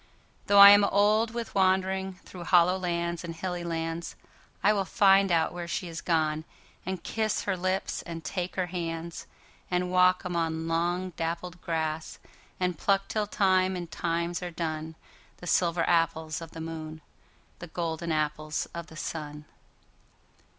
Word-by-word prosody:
Though 200 - +4
I 200 0 +12
am 205 0 +7
old 210 +3 +3
with 235 0 -5
wanderingThrough 190 -1 0
hollow 180 0 +5
lands 170 -1 -2
and 165 -1 -6
hilly 175 0 -4
lands,I 165 +4 -3
will 200 -2 +1
find 195 +1 +4
out 165 -1 +2
where 175 -1 -5
she 175 - -3
has 165 - -6
gone, 155 -2 0 0.4
And 190 -2 -3
kiss 220 -1 -1
her 200 - 0
lips 185 +2 -2
and 165 -2 -7
take 180 -2 -4
her 185 - 0
hands; 170 -1 -5 0.4
And 180 0 0
walk 185 0 +4
among 165 -2 -1
long 175 +3 0
dappled 170 +2 -4
grass, 160 -1 -3 0.4
And 180 -3 -1
pluck 195 -1 +1
till 215 -1 -1
time 185 -2 +2
and 175 -2 -6
times 170 +1 -2
are 180 - -4
done, 160 -1 -4 0.4
The - - -11
silver 170 -1 +1
apples 160 -1 +1
of 165 - -8
the 160 - -9
moon, 160 -1 -6 0.6
The 175 - -8
golden 165 0 -3
apples 155 0 -1
of 170 0 -6
the 160 - -12
sun. 150 -1 -5
175 Hz, 150 wpm, -28 LUFS, 165-185 Hz, 0.6 s, I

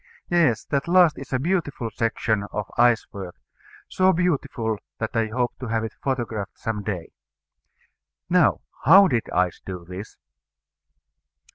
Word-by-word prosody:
Yes, 150 -10 +3
that 140 +1 -1
last 175 -2 +5
is 135 - -10
a 130 - +2
beautiful 145 -6 -1
section 110 -1 0
of 105 -2 -4
ice 120 -1 +4
work; 95 -4 -7 0.5
so 185 0 +3
beautiful, 140 - -1 0.2
that 110 +2 -4
I 115 -1 +2
hope 120 +2 -1
to 125 - -5
have 115 0 -1
it 110 - -5
photographed 115 -7 -3
some 110 -2 -3
day. 95 -5 -5 1.2
Now, - - +3 0.2
how 190 +8 +8
did 120 -9 -1
ice 90 -1 0
do 90 -2 -7
this? 90 +4 -9
115 Hz, 140 wpm, -24 LUFS, 105-140 Hz, 1.2 s, how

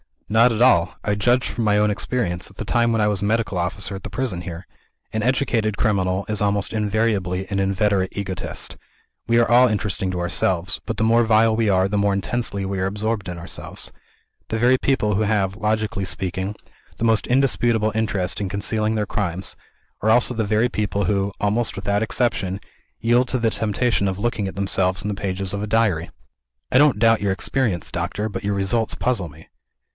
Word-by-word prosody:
"Not 115 +3 +5
at 110 - -2
all. 95 -8 +4
I 105 - 0
judged 120 +5 +2
from 115 - -2
my 105 -1 +3
own 105 0 +3
experience, 100 -5 -2
at 95 - -18
the 105 - -6
time 120 +1 +2
when 110 - +1
I 105 - +3
was 105 -2 0
Medical 105 -1 0
Officer 90 +2 -1
at 95 - -8
the - - -6
prison 105 -5 -2
here. 85 +1 -7 0.5
An 110 - -2
educated 115 -4 0
criminal 95 -3 0
is 105 -1 +2
almost 100 -1 +1
invariably 105 -4 0
an 100 - 0
inveterate 95 0 +1
egotist. 95 -3 -4 0.5
We 115 - +3
are 115 - +3
all 125 +1 +7
interesting 100 -4 -2
to 90 -1 -3
ourselves 85 0 0
but - - -2
the 110 - -1
more 115 +1 +4
vile 110 0 +4
we 115 -1 +1
are, 95 -1 +3
the 105 +1 -1
more 100 0 +2
intensely 100 0 -1
we 95 0 -3
are 95 - 0
absorbed 105 0 -2
in 90 - -5
ourselves. 85 0 -7 0.6
The 110 - -2
very 125 +3 +4
people 105 -7 +1
who 110 - +1
have, 100 -2 0
logically 110 -2 -1
speaking, 95 +2 -3 0.4
the - - -4
most 115 -1 +2
indisputable 120 -4 +2
interest 105 -5 -1
in 100 - -2
concealing 110 +2 -1
their 105 -1 0
crimes, 90 -1 -3 0.4
are 110 - +1
also 120 +2 +4
the 110 -2 -1
very 110 +4 +2
people 105 -2 -1
who, 100 +1 0
almost 110 +3 0
without 100 +1 -1
exception, 105 -4 0 0.4
yield 120 +3 +3
to 130 - -1
the 115 -2 +1
temptation 110 -1 0
of 95 -1 -2
looking 110 -1 -1
at 95 - -6
themselves 95 -1 -1
in 105 - -2
the - - -1
pages 95 -1 -2
of 100 - -3
a 105 - -3
Diary." 100 -7 +1 0.6
"I - - +4
don't 145 -7 +4
doubt 115 -1 +4
your 100 -2 +1
experience, 105 -2 -1
doctor. 90 +5 -2
But 100 - -6
your 100 0 0
results 100 +3 0
puzzle 115 -9 -1
me." 80 +1 -15
105 Hz, 200 wpm, -22 LUFS, 95-115 Hz, 0.6 s, all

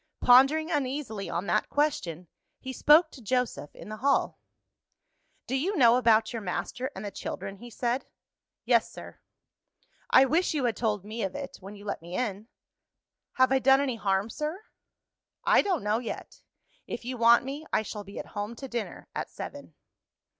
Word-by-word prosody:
Pondering 275 +7 +5
uneasily 265 -8 -2
on 175 - -2
that 215 - 0
question, 180 - -1 0.3
he 260 0 -6
spoke 310 +4 +5
to 265 - -12
Joseph 250 - -2
in - - -11
the 215 - -6
hall. 275 +4 +1 1.1
"Do 260 - -2
you 355 +9 0
know 240 -4 +6
about 225 -3 +3
your 230 - -4
master 245 +7 -3
and 195 - -6
the 205 - -4
children?" 195 0 -6
he 240 +4 -11
said. 240 +2 -2 0.6
"Yes, - - +3
sir." - - -11 0.9
"I 265 - +7
wish 320 +4 +1
you 280 -4 0
had 235 - +1
told 210 -4 -1
me 220 +2 -5
of 190 -2 -2
it, 280 -1 -6
when 195 +2 -10
you 205 0 -13
let 200 - -4
me 170 +2 -8
in." 215 -3 -3 0.9
"Have 260 0 +3
I 265 - +4
done 270 +1 +5
any 265 -4 -1
harm, 195 +1 0
sir?" 310 - -4 0.8
"I - - +5
don't 370 - -1
know 210 +2 +1
yet. 240 - -7 0.5
If - - -6
you 255 +1 -3
want 235 +1 +5
me, 290 +4 -6
I - - +2
shall 210 -1 -6
be 200 0 -11
at - - -5
home 210 +2 -4
to 270 +3 -7
dinner 240 -3 -5
at - - -4
seven." - - -9
240 Hz, 180 wpm, -28 LUFS, 210-270 Hz, 1.1 s, I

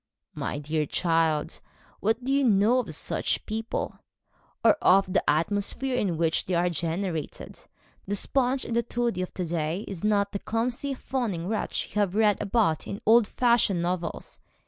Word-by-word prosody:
'My - - -3
dear 150 +1 -2
child, 165 -3 0 0.4
what 225 +4 0
do 270 +2 0
you 280 0 +3
know 225 +1 +4
of 185 -11 -4
such - - -2
people 225 +1 -4 0.7
or - - +9
of 190 0 +4
the - - +3
atmosphere 205 - 0
in 190 -9 0
which 165 0 +1
they 180 - 0
are 175 +1 +2
generated? 170 0 -3 0.5
The 205 - -1
sponge 260 +4 0
and 235 0 0
toady 235 -5 -1
of 185 - -4
to 180 - -2
day 165 +3 -2
is 195 -3 -7
not 205 -1 +2
the 200 - -3
clumsy 245 +6 -2
fawning 220 -11 -3
wretch 215 +1 -2
you 210 - 0
have 195 -2 0
read 210 -2 +3
about 200 -6 +1
in 200 - -5
old 225 0 +6
fashioned 235 -8 +2
novels. 175 0 -3
200 Hz, 165 wpm, -27 LUFS, 170-230 Hz, 0.7 s, or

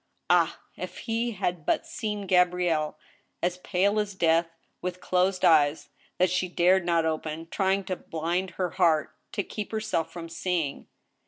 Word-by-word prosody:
Ah! - - +3 0.2
if - - -6
he 230 +1 -1
had 180 -4 -2
but - - +1
seen 210 -3 -4
Gabrielle, 180 -4 +2 0.5
as 180 +1 0
pale 200 +3 +1
as 205 -2 -2
death, 165 -1 +3 0.3
with 180 0 -4
closed 185 +1 +1
eyes 150 -2 +4 0.3
that 180 -1 +3
she 185 0 +1
dared 180 +1 +4
not 170 -2 +2
open, 160 0 -3
trying 195 0 +1
to 185 -1 -3
blind 170 +4 -2
her 180 -2 -1
heart, 165 -4 +2 0.2
to 200 - -1
keep 210 +1 -6
her 220 - -1
self 165 -7 -1
from 170 -1 -7
seeing 165 -3 -2
180 Hz, 160 wpm, -27 LUFS, 165-190 Hz, 0.5 s, eyes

